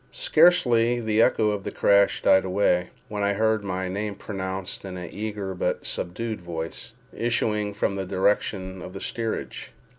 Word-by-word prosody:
Scarcely 140 - +4
had 120 -2 -4
the 110 0 +3
echo 110 -2 +3
of 100 -2 -3
the - - -3
crash 100 0 +3
died 95 - +5
away, 90 -2 +1 0.2
when 105 -3 -4
I 100 0 +2
heard 110 0 +1
my 95 -1 -2
name 100 +2 -3
pronounced 95 -2 -5
in 95 -2 -6
an 90 -1 -6
eager 105 -2 -4
but 90 - -2
subdued 110 +4 -3
voice, 80 -2 -6 0.2
issuing 105 -3 0
from 100 -1 -1
the 95 - -2
direction 95 -1 0
of 90 - -8
the 95 - -6
steerage. 115 +1 -4
100 Hz, 170 wpm, -25 LUFS, 95-110 Hz, 0.2 s, died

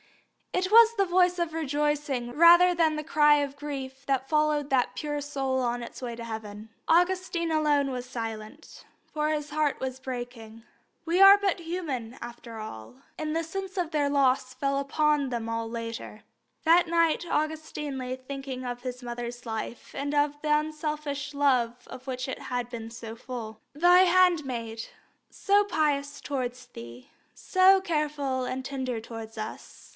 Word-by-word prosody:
It 370 0 0
was 460 +1 +7
the 395 - +3
voice 360 0 +3
of 340 -2 -1
rejoicing 295 -4 -1
rather 345 +5 +7
than 325 -2 +2
the 305 - -3
cry 295 -2 +5
of 285 -1 -1
grief 275 -2 -6
that 270 -1 0
followed 300 -1 +1
that 260 -2 +2
pure 295 -1 -3
soul 270 -2 -2
on 240 0 -1
its 235 - -9
way 240 -2 -4
to 235 - -8
heaven. 220 -1 -7 0.2
Augustine 350 -1 +2
alone 295 -3 +2
was 250 -1 -4
silent, 225 +3 -7 0.3
for 305 -1 0
his 295 -1 -2
heart 300 -1 0
was 260 0 -4
breaking. 240 -3 -7 0.4
We 350 +3 +2
are 395 +1 +10
but 395 -2 0
human, 295 -9 -4
after 235 -1 -9
all, 110 - -8 0.2
and 310 -1 -3
the 330 - 0
sense 385 +4 -6
of 345 -3 -1
their 290 -3 +1
loss 265 -2 +2
fell 275 0 0
upon 295 0 +1
them 235 -2 -3
all 230 0 -3
later. 230 -2 -6 0.4
That 340 +2 +5
night 335 0 +2
Augustine 305 -2 -2
lay 255 0 -3
thinking 260 0 -7
of 245 0 -5
his 250 0 -6
mother's 240 0 -6
life 225 +1 -6
and 285 +1 -2
the 290 0 +2
unselfish 300 -1 -1
love 250 -4 +1
of 260 +1 -11
which 255 0 -3
it 265 - -4
had 245 -1 -3
been 225 -2 -7
so 225 -1 -8
full. 230 -3 -7
"Thy 350 +5 +6
handmaid, 300 -12 +2 0.4
so 405 +1 +3
pious 290 -6 -1
towards 255 -2 -4
Thee, 120 - -11 0.3
so 380 +1 +5
careful 300 -7 -1
and 255 +1 -4
tender 260 -3 -3
towards 225 0 -9
us. 215 0 -8
280 Hz, 160 wpm, -27 LUFS, 245-310 Hz, 0.4 s, are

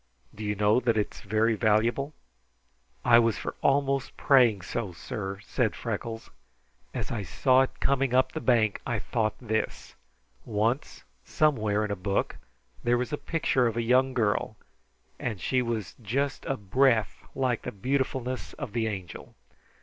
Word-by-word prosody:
"Do 110 - -8
you 105 0 -1
know 105 +3 +3
that 115 -3 +1
it 105 - 0
is - - -12
very 110 +2 +2
valuable?" 115 +6 +1 0.9
"I 120 -1 +7
was 115 -2 +2
for - - -4
almost 135 -1 +1
praying 120 -8 +4
so, 105 -1 -4
sir," 95 +4 -5
said - - 0
Freckles. 115 -1 -5 0.6
"As - - -4
I 115 - -2
saw 130 +8 +3
it 135 - -2
coming 135 -2 +1
up 130 - +3
the 160 - -5
bank 110 -5 +2
I - - -1
thought 110 -2 -1
this: 110 -3 -3 0.5
Once 115 +5 -1 0.2
somewhere 110 -9 +1
in 105 - -4
a - - 0
book 100 +1 -1 0.5
there 120 +1 +3
was 125 +5 -3
a - - +3
picture 145 -5 +1
of 115 0 -2
a 115 - +1
young 130 +2 +3
girl, 110 -2 0 0.6
and 110 -6 -3
she 130 +6 +1
was 110 -8 -3
just 135 +6 -2
a 135 - -1
breath 110 +1 +2
like 130 -3 0
the - - -5
beautifulness 130 +3 -2
of 140 -8 -7
the 115 -1 0
Angel. 95 -6 -7
115 Hz, 160 wpm, -28 LUFS, 105-130 Hz, 0.9 s, I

